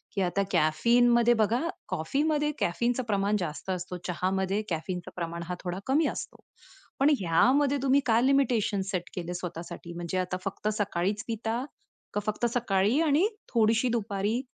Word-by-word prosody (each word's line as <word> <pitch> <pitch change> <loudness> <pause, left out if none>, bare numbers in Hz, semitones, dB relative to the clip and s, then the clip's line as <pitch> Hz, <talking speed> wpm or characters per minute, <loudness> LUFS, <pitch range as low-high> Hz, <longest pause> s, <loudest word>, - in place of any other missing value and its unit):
की 195 - +1
आता 190 +2 +1
कॅफीनमध्ये 235 +9 +4
बघा, 225 +3 +2 0.3
कॉफीमध्ये 295 - 0
कॅफीनचं 240 +8 0
प्रमाण 200 0 +1
जास्त 170 +2 -5
असतं, 180 0 -3
चहामध्ये 190 +3 0
कॅफीनचं 175 +2 -4
प्रमाण 170 -1 -4
हा 180 - -3
थोडं 180 +1 -3
कमी 300 +4 +3
असतो. - - -6 0.6
पण 280 +2 +5
यामध्ये 265 - +3
तुम्ही 275 +1 +4
काय 230 -1 +4
लिमिटेशन 245 -7 +2
सेट 180 -2 -3
केले 175 -1 -4
स्वतःसाठी? 170 -1 -6
म्हणजे 175 +2 -4
आता 185 0 -1
फक्त 195 +2 -3
सकाळीच 200 +2 -1
पिता? 230 +2 -2 0.5
का 210 - 0
फक्त 215 +3 -1
सकाळीही 230 +2 +2
आणि 320 +5 +3 0.3
थोडीशी 225 +2 +3
दुपारी? 215 +1 -1
205 Hz, 145 wpm, -28 LUFS, 180-240 Hz, 0.6 s, पण